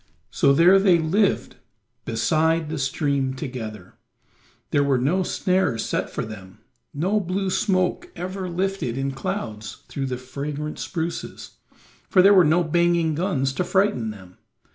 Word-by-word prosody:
So -, -, +3 dB
there 175 Hz, +7 st, +6 dB
they 190 Hz, -3 st, +5 dB
lived 185 Hz, +6 st, 0 dB, 0.5 s
beside 160 Hz, +7 st, +1 dB
the 155 Hz, -1 st, -3 dB
stream 135 Hz, -1 st, -1 dB
together; 110 Hz, -, -7 dB, 0.7 s
there 145 Hz, -, +3 dB
were 140 Hz, -2 st, +2 dB
no 150 Hz, +10 st, +1 dB
snares 180 Hz, -, 0 dB
set -, -, -2 dB
for -, -, -4 dB
them, 100 Hz, -4 st, -10 dB, 0.3 s
no 185 Hz, +9 st, 0 dB
blue 190 Hz, 0 st, -2 dB
smoke 190 Hz, -, 0 dB
ever 185 Hz, +1 st, -5 dB
lifted 180 Hz, -8 st, -2 dB
in 135 Hz, 0 st, -1 dB
clouds 110 Hz, -5 st, -5 dB
through 135 Hz, -1 st, -3 dB
the 125 Hz, -1 st, -3 dB
fragrant 145 Hz, +4 st, -5 dB
spruces, 170 Hz, -1 st, -5 dB, 0.5 s
for 185 Hz, -, +5 dB
there 200 Hz, +1 st, +7 dB
were 185 Hz, -2 st, +7 dB
no 165 Hz, +3 st, +3 dB
banging 170 Hz, 0 st, +2 dB
guns 150 Hz, -6 st, -1 dB
to 180 Hz, -, -1 dB
frighten 190 Hz, -, +1 dB
them. 95 Hz, -4 st, -12 dB
155 Hz, 140 wpm, -23 LUFS, 130-185 Hz, 0.7 s, there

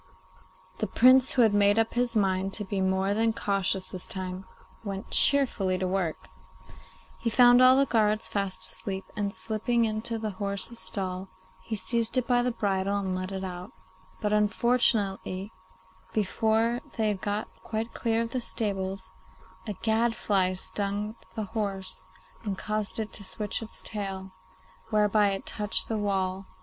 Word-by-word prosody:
The -, -, 0 dB
Prince, 255 Hz, +1 st, +6 dB
who 250 Hz, -, +5 dB
had 220 Hz, -2 st, +4 dB
made 205 Hz, 0 st, +4 dB
up 225 Hz, 0 st, +2 dB
his 240 Hz, -1 st, 0 dB
mind 195 Hz, -2 st, +1 dB
to 210 Hz, -, -4 dB
be 195 Hz, 0 st, -2 dB
more 190 Hz, +1 st, +1 dB
than 225 Hz, +1 st, +2 dB
cautious 195 Hz, -2 st, 0 dB
this 185 Hz, -, -2 dB
time, 185 Hz, 0 st, -5 dB, 0.4 s
went 195 Hz, -2 st, -6 dB
cheerfully 235 Hz, -10 st, +4 dB
to 185 Hz, 0 st, -1 dB
work. 180 Hz, -4 st, -2 dB, 0.9 s
He 230 Hz, -, 0 dB
found 245 Hz, +1 st, +6 dB
all 255 Hz, +1 st, +8 dB
the 275 Hz, -, +4 dB
guards 215 Hz, -3 st, +1 dB
fast 195 Hz, -2 st, -1 dB
asleep, 190 Hz, -3 st, -4 dB
and, 205 Hz, -1 st, -1 dB
slipping 230 Hz, +3 st, 0 dB
into 220 Hz, +1 st, -1 dB
the 215 Hz, -1 st, -3 dB
horse's 200 Hz, +4 st, -4 dB
stall, 185 Hz, 0 st, -2 dB, 0.3 s
he 225 Hz, -, -4 dB
seized 230 Hz, +4 st, -1 dB
it 255 Hz, -, +2 dB
by 245 Hz, 0 st, +3 dB
the 245 Hz, -, +1 dB
bridle 200 Hz, -3 st, 0 dB
and 190 Hz, -2 st, -2 dB
led 185 Hz, +1 st, -4 dB
it 190 Hz, 0 st, -4 dB
out; 180 Hz, +3 st, -6 dB, 0.5 s
but, 210 Hz, -1 st, 0 dB
unfortunately, 210 Hz, -3 st, +1 dB, 0.6 s
before 220 Hz, +3 st, +1 dB, 0.2 s
they 220 Hz, -1 st, +2 dB
had 200 Hz, -2 st, -2 dB
got 205 Hz, +1 st, -2 dB, 0.2 s
quite 225 Hz, 0 st, -3 dB
clear 230 Hz, -1 st, 0 dB
of 230 Hz, -, -6 dB
the 255 Hz, -, -2 dB
stables 195 Hz, -4 st, -2 dB, 0.5 s
a 210 Hz, -, -2 dB
gadfly 220 Hz, -4 st, +2 dB
stung 205 Hz, +3 st, -2 dB, 0.2 s
the 220 Hz, -, -2 dB
horse 195 Hz, -, -4 dB, 0.4 s
and 200 Hz, -2 st, -3 dB
caused 215 Hz, 0 st, -3 dB
it 220 Hz, -1 st, -4 dB
to 205 Hz, -, -8 dB
switch 210 Hz, +3 st, -2 dB
its 225 Hz, -, -6 dB
tail, 195 Hz, -2 st, -5 dB, 0.6 s
whereby 210 Hz, -1 st, +3 dB
it 195 Hz, 0 st, -3 dB
touched 210 Hz, 0 st, 0 dB
the 220 Hz, -, 0 dB
wall. 190 Hz, -2 st, -1 dB
205 Hz, 160 wpm, -28 LUFS, 190-225 Hz, 0.9 s, all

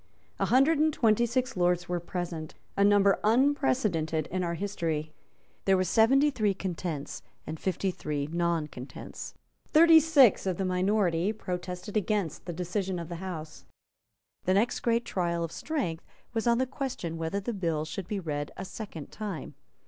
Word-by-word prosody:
A -, -, +1 dB
hundred 275 Hz, +5 st, +4 dB
and 310 Hz, +1 st, +4 dB
twenty 235 Hz, -3 st, +3 dB
six 255 Hz, +2 st, -1 dB
lords 175 Hz, -1 st, +1 dB
were 175 Hz, 0 st, -1 dB
present, 170 Hz, -3 st, -5 dB, 0.2 s
a 200 Hz, -, +3 dB
number 200 Hz, -1 st, +5 dB
unprecedented 215 Hz, -, +2 dB
in 185 Hz, +1 st, -1 dB
our 170 Hz, -1 st, -1 dB
history. 165 Hz, -5 st, -2 dB, 0.5 s
There 195 Hz, -1 st, +4 dB
were 185 Hz, -, +2 dB
seventy 260 Hz, -, +4 dB
three 210 Hz, -6 st, +1 dB
Contents, 175 Hz, -6 st, -4 dB, 0.2 s
and 160 Hz, -, -6 dB
fifty 190 Hz, +1 st, -1 dB
three 150 Hz, -4 st, -3 dB
Not 170 Hz, -1 st, -1 dB
Contents. 125 Hz, +2 st, -8 dB, 0.3 s
Thirty 325 Hz, +1 st, +8 dB
six 280 Hz, -11 st, +5 dB
of 185 Hz, -2 st, 0 dB
the 195 Hz, -, -1 dB
minority 185 Hz, -1 st, +1 dB
protested 180 Hz, -1 st, -5 dB
against 205 Hz, -6 st, -1 dB
the -, -, -2 dB
decision 180 Hz, +2 st, -2 dB
of 170 Hz, -1 st, -6 dB
the 170 Hz, -, -5 dB
House. 160 Hz, -, -7 dB, 0.8 s
The 185 Hz, -, +3 dB
next 220 Hz, +5 st, +2 dB
great 235 Hz, 0 st, +1 dB
trial 170 Hz, -5 st, -1 dB
of 165 Hz, -, -4 dB
strength 210 Hz, -, -3 dB, 0.3 s
was 225 Hz, 0 st, -1 dB
on 235 Hz, 0 st, +4 dB
the 260 Hz, -, +2 dB
question 245 Hz, -11 st, -4 dB
whether 165 Hz, +5 st, -1 dB
the 215 Hz, +4 st, -3 dB
bill 165 Hz, -6 st, -1 dB
should 170 Hz, +4 st, -6 dB
be 205 Hz, -, -2 dB
read 145 Hz, -4 st, -3 dB
a 190 Hz, -, -5 dB
second 185 Hz, -6 st, -8 dB
time. 200 Hz, -9 st, -5 dB
185 Hz, 165 wpm, -29 LUFS, 165-220 Hz, 0.8 s, Thirty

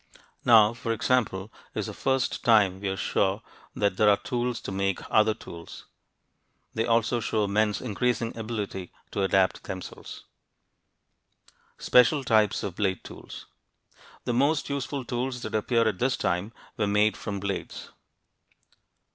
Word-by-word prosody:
Now, 110 Hz, -2 st, +6 dB
for 115 Hz, -1 st, -2 dB
example, 110 Hz, -4 st, 0 dB, 0.2 s
is -, -, -1 dB
the -, -, -6 dB
first 135 Hz, -1 st, -1 dB
time 105 Hz, -6 st, +4 dB
we 100 Hz, 0 st, -2 dB
are 95 Hz, -, -3 dB
sure 100 Hz, +3 st, 0 dB, 0.3 s
that 100 Hz, -2 st, 0 dB
there 105 Hz, -1 st, +5 dB
are 100 Hz, -, +5 dB
tools 120 Hz, -1 st, -2 dB
to -, -, -6 dB
make 95 Hz, -1 st, 0 dB
other 110 Hz, 0 st, +4 dB
tools. 85 Hz, -1 st, -11 dB, 0.9 s
They 110 Hz, -, -1 dB
also 115 Hz, +1 st, +2 dB
show 110 Hz, -2 st, 0 dB
men's 105 Hz, 0 st, +1 dB
increasing 120 Hz, 0 st, -1 dB
ability 105 Hz, -5 st, -5 dB, 0.2 s
to 100 Hz, -, -2 dB
adapt 95 Hz, -1 st, +2 dB
themselves. 95 Hz, -1 st, -8 dB, 1.5 s
SPECIAL 135 Hz, +3 st, +4 dB
TYPES 110 Hz, -4 st, +2 dB
OF 95 Hz, -4 st, -4 dB
BLADE 95 Hz, -3 st, -1 dB
TOOLS -, -, -10 dB, 0.8 s
The 120 Hz, -, -1 dB
most 140 Hz, +4 st, +1 dB
useful 140 Hz, -1 st, -3 dB
tools 125 Hz, +1 st, -3 dB
that -, -, -5 dB
appear 115 Hz, +1 st, +2 dB
at 105 Hz, -4 st, -1 dB
this 125 Hz, +1 st, +1 dB
time 90 Hz, +5 st, -1 dB, 0.3 s
were 105 Hz, -, +1 dB
made 105 Hz, +1 st, +3 dB
from 100 Hz, -1 st, -5 dB
blades. 100 Hz, 0 st, -5 dB
110 Hz, 140 wpm, -27 LUFS, 100-120 Hz, 1.5 s, Now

